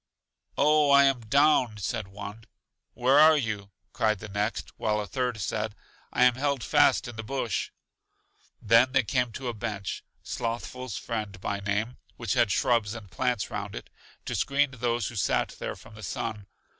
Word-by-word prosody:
Oh, 150 0 +4
I 140 0 +7
am 135 -2 +3
down! 125 -1 +3
said 105 +1 -3
one. 100 +3 -9 0.5
Where 130 +4 +4
are 155 0 +8
you? 105 -6 -3 0.2
cried 110 -1 +1
the 105 +2 -9
next; 100 -5 -2
while 105 -1 0
a 105 - -2
third 125 0 -2
said, 105 0 -2 0.4
I - - +3
am 125 0 +6
held 140 -1 -1
fast 145 -1 +4
in 120 -2 -8
the - - -3
bush! 120 -2 -2 0.9
Then 115 +4 +4
they 135 -2 +4
came 125 +3 0
to 130 +2 -5
a 120 - -1
bench, 105 -3 -4 0.2
Slothful's 120 0 -4
Friend 105 -5 -4
by 100 +1 -2
name, 105 +4 -2 0.2
which 115 - -1
had 120 -4 +3
shrubs 115 0 +1
and 105 -5 -10
plants 125 -5 -1
round - - -4
it, - - -9 0.3
to - - -3
screen 140 +1 +1
those 120 -3 -1
who 120 - -10
sat 100 - +1
there - - -4
from 115 - -15
the 110 - -11
sun. 105 -2 -4
115 Hz, 175 wpm, -27 LUFS, 105-130 Hz, 0.9 s, are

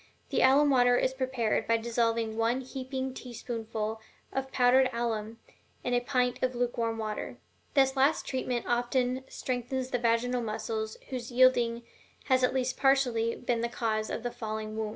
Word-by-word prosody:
The - - +2
alum 285 +2 +5
water 245 -1 +5
is 260 - +1
prepared 260 -4 -1
by 230 - +3
dissolving 230 -1 0
one 230 +3 +1
heaping 260 0 -4
teaspoonful 225 -3 -5 0.3
of 265 0 -3
powdered 255 +1 +4
alum 230 -2 -2 0.5
in 245 - -1
a 245 - +4
pint 250 0 0
of 255 -1 0
lukewarm 235 -2 -1
water. 215 -1 -4 0.4
This 270 -1 +4
last 275 +3 +2
treatment 255 -2 -2
often 245 +2 0
strengthens 255 +1 -3
the 245 - 0
vaginal 240 +1 +1
muscles 220 0 -3
whose 250 -2 -5
yielding 240 -2 +4 0.5
has 260 -1 +4
at 250 - +4
least 260 -1 -1
partially 250 -4 +2
been 240 -2 -1
the 235 - -1
cause 220 -2 -1
of - - -4
the 245 - -2
falling 215 -1 -5
womb. 220 -1 -2
245 Hz, 160 wpm, -29 LUFS, 230-260 Hz, 0.5 s, alum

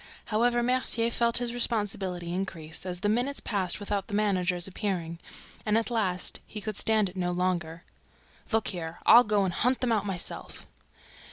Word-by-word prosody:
However, 240 +2 +3
Mercier 240 -2 +1
felt 235 0 +2
his 245 -1 0
responsibility 195 -7 -1
increased 170 -2 -5
as 180 0 -4
the - - +1
minutes 245 +6 +1
passed 190 -4 -1
without 205 -1 -2
the 205 - -3
managers' 185 -4 +1
appearing; 180 -4 -3 0.4
and, 210 0 +2
at 230 +2 0
last, 185 -6 0
he 215 - -6
could 215 -1 -4
stand 220 -2 +3
it 180 - -6
no 180 -1 -1
longer. 175 -2 -1 0.7
"Look 225 -2 +2
here, 170 -3 -5
I'll 240 - +9
go 210 -3 +2
and 180 - -1
hunt 250 +6 +1
them 250 -2 0
out 210 -2 +1
myself!" 185 -3 -4
205 Hz, 170 wpm, -28 LUFS, 180-230 Hz, 0.7 s, I'll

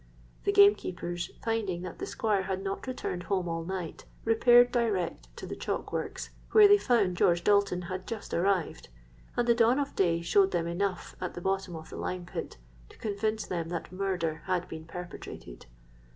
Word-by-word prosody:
The - - +3
gamekeepers, 180 -4 +3
finding 210 -6 -1
that 185 - -7
the - - -4
Squire 210 -3 0
had 190 0 -3
not 195 +5 -4
returned 215 -8 -3
home 185 0 -1
all 165 0 -2
night, 180 -2 -5 0.2
repaired 240 +2 +6
direct 215 -8 -1
to - - -6
the - - -5
chalk - - -4
works, - - -4 0.2
where 430 -1 +9
they 410 0 +6
found 210 - +2
George 175 0 +3
Dalton 200 -3 +3
had 185 +1 -5
just 225 -3 -6
arrived; 180 - 0 0.5
and 240 - +1
the 235 - +6
dawn 230 +2 +4
of 285 -1 -2
day 170 -3 +2
showed 195 +3 +4
them 170 -2 -1
enough 180 +2 -2
at 180 - -4
the 175 - -6
bottom 190 -1 -1
of 160 0 -9
the - - -7
lime 180 -1 -3
pit 175 - -6 0.3
to - - -17
convince 215 0 -2
them 165 -2 -3
that 170 -1 -5
murder 180 -4 -2
had 180 -2 -1
been 160 0 -8
perpetrated. 170 - -9
190 Hz, 180 wpm, -29 LUFS, 175-215 Hz, 0.5 s, where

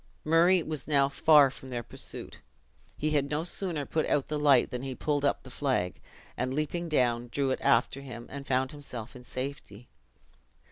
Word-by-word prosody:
Murray 170 +3 +4
was 155 -3 -5
now 140 -2 +4
far 145 -1 +6
from 135 - -11
their 120 -2 -3
pursuit. - - -7 0.6
He 155 +1 -1
had 140 -2 +1
no 150 +2 -1
sooner 175 -4 -2
put 160 +2 -1
out 140 - +1
the 150 -1 -1
light, 140 -4 +4
than 125 -1 -4
he 135 -1 -5
pulled 145 0 -1
up 140 - +1
the 130 - -12
flag, 125 -11 -1 0.3
and 130 +1 -2
leaping 165 +3 -2
down, 120 -5 +2
drew 135 +2 0
it - - -1
after 125 +3 +2
him, 120 -3 -8
and 140 0 -7
found 130 0 +1
himself 130 -5 -8
in 125 - -11
safety. 125 -4 -6
140 Hz, 185 wpm, -29 LUFS, 125-150 Hz, 0.6 s, far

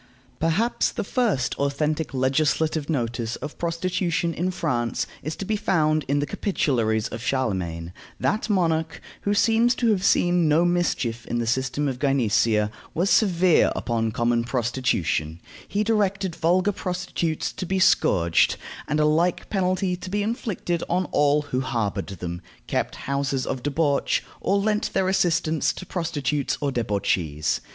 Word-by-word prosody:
Perhaps 195 +9 +1
the - - -2
first 205 - 0
authentic 150 +3 -1
legislative 145 +3 +1
notice 115 -5 -1
of 150 +3 -8
prostitution 170 0 -1
in 175 +3 -1
France 125 -10 -1 0.2
is 155 +3 -4
to 195 - -5
be 215 - 0
found 155 -6 +1
in 140 +2 +1
the 145 - +1
Capitularies 120 - 0
of 115 - -6
Charlemagne. 95 -10 -2 0.3
That 215 +2 0
monarch, 165 -5 +1 0.2
who 205 0 0
seems 230 +3 +3
to 235 -2 +2
have 195 -3 0
seen 175 -4 +3
no 160 +3 +4
mischief 155 -10 0
in 120 - -2
the 120 - -1
system 130 +4 0
of 130 -2 -3
gynecea, 115 -5 +2 0.2
was 180 +5 +1
severe 185 -4 +4
upon 115 -2 -1
common 120 +1 +1
prostitution. 120 - -1 0.3
He 205 +1 0
directed 200 -4 0
vulgar 180 +4 +2
prostitutes 180 -4 -3
to 185 - -5
be 190 - 0
scourged, 85 - +3 0.3
and 150 +1 0
a 150 - +4
like 165 +4 +1
penalty 185 -2 +1
to 185 - -8
be 205 +2 0
inflicted 205 -6 -2
on 180 +2 +1
all 145 0 +3
who 130 -3 -2
harbored 115 -6 -2
them, 85 -2 -6 0.2
kept - - -2
houses 140 -1 -1
of 130 - -3
debauch, 145 +1 +1 0.2
or 200 - +1
lent 210 +1 0
their 190 -1 +1
assistance 165 -4 +1
to 185 - -8
prostitutes 150 -6 -1
or 145 -2 -1
debauchees. 95 - -1
155 Hz, 150 wpm, -24 LUFS, 125-185 Hz, 0.3 s, no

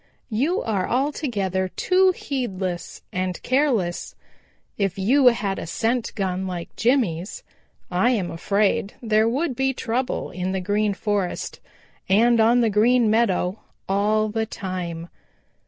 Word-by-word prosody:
"You 285 - 0
are 200 -5 -1
altogether 235 - -1
too 370 - +3
heedless 195 - -4
and 185 -1 -2
careless. 250 -10 0 0.6
If 195 -1 -1
you 250 +8 +4
had 205 -5 +2
a - - -6
scent 230 +6 -1
gun 190 -2 -2
like 175 -2 -6
Jimmy's, 215 -8 0 0.5
I 185 +7 +3
am 205 -8 0
afraid 200 +4 0
there 220 -1 +2
would 275 +3 -1
be 265 +1 +1
trouble 250 +2 -2
in 185 +1 -3
the 190 - -1
Green 205 +2 0
Forest 205 -3 -2 0.5
and 230 +4 +4
on 235 +2 +5
the 230 - +3
Green 225 +2 +4
Meadow 205 -4 +1 0.3
all 215 +2 +1
the 220 +1 -2
time. 180 -5 -5
215 Hz, 130 wpm, -23 LUFS, 190-240 Hz, 0.6 s, on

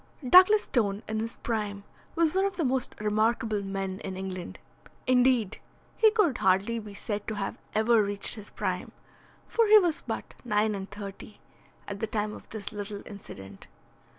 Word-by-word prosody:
Douglas 375 +8 +8
Stone 205 -3 0
in 220 0 -2
his 230 +1 -4
prime 210 -3 -3 0.3
was 325 -2 +2
one 380 +1 +2
of 395 - -1
the 335 - -1
most 255 -1 -1
remarkable 215 0 +1
men 195 -1 -4
in 190 -1 -6
England. 185 -2 -6 0.5
Indeed, 250 -4 +3 0.4
he 440 - +6
could 420 - +2
hardly 195 +5 +2
be 210 -2 -10
said 205 0 -4
to 220 - -2
have 200 -1 -4 0.2
ever 220 +1 +4
reached 200 -1 0
his 210 -3 -7
prime, - - -3 0.5
for 460 -1 +2
he 430 +1 +9
was 350 -6 +2
but - - -5
nine 215 -2 +1
and 195 -1 -5
thirty 205 +1 -9 0.5
at 200 -1 -5
the 225 - -2
time 210 -1 -2
of - - -12
this 210 -2 -6
little 205 -1 -6
incident. 95 - -11
215 Hz, 170 wpm, -28 LUFS, 200-245 Hz, 0.5 s, he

